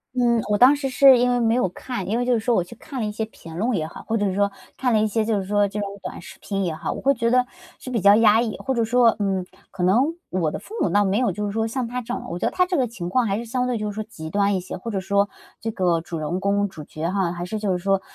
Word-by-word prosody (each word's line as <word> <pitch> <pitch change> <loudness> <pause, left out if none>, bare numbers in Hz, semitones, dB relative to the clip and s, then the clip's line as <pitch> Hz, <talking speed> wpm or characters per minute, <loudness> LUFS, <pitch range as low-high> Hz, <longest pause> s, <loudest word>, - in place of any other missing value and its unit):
嗯， 235 -2 +3
我 205 - +3
当 255 +6 +7
时 280 -2 -3
是 265 0 +7
因 245 +1 +2
为 245 - +2
没 230 -1 +2
有 245 -7 +1
看， 220 +2 -5
因 225 - +1
为 245 - 0
就 250 - +2
是 235 - +2
说 240 +2 +1
我 185 - +3
去 235 - -12
看 270 +2 -8
了 225 - -1
一 210 - -2
些 220 - -2
评 165 -7 -10
论 230 +7 0
也 155 -2 -2
好， - - -11
或 225 - -1
者 205 -3 0
说 200 0 +2 0.3
看 255 -1 +1
了 215 - +4
一 215 - +2
些 220 +1 0
就 215 -2 0
是 190 - -4
说 205 0 +3
这 210 +1 -4
种 205 - -2 0.2
短 - - -6
视 190 - -12
频 195 -2 -2
也 165 - -2
好， 160 - -4
我 - - -5
会 275 - +3
觉 230 -2 0
得 250 0 +4 0.3
是 - - -8
比 235 -4 -1
较 200 +1 +7
压 220 0 +5
抑。 225 -3 -3
或 265 -1 -2
者 235 - +2
说， 235 0 +4
嗯， 190 -3 0 0.3
可 190 -2 -4
能 245 - +3 0.2
我 170 -4 0
的 - - -5
父 420 - -13
母 - - +2
倒 205 0 +3
没 195 +1 +1
有 250 - +2
就 210 0 -3
是 205 - -3
说 225 0 0
像 235 +1 -2
她 250 +1 -3
这 245 +1 -5
样， - - -5
我 170 - -4
觉 - - -2
得 - - +1
她 365 - +2
这 365 - -2
个 265 - +2
情 190 -6 -6
况 240 +7 +2
还 200 -1 0
是 235 - -5
相 250 +2 -1
对 250 -2 -1
就 210 -1 -3
是 205 - -7
说 215 - -3
极 160 -8 -9
端 200 +2 +2
一 190 - +1
些。 180 - -7
或 230 +5 -6
者 200 - -1
说 200 +2 +1 0.3
这 225 - -2
个 180 -5 +1
主 165 0 -6
人 160 +5 -2
公、 200 +1 +1
主 160 -6 -10
角 155 +3 -4
哈， 190 -3 0
还 175 0 -5
是 215 +4 -4
就 205 -2 -1
是 180 - +1
说 195 +1 +1
210 Hz, 350 characters per minute, -23 LUFS, 190-240 Hz, 0.3 s, 当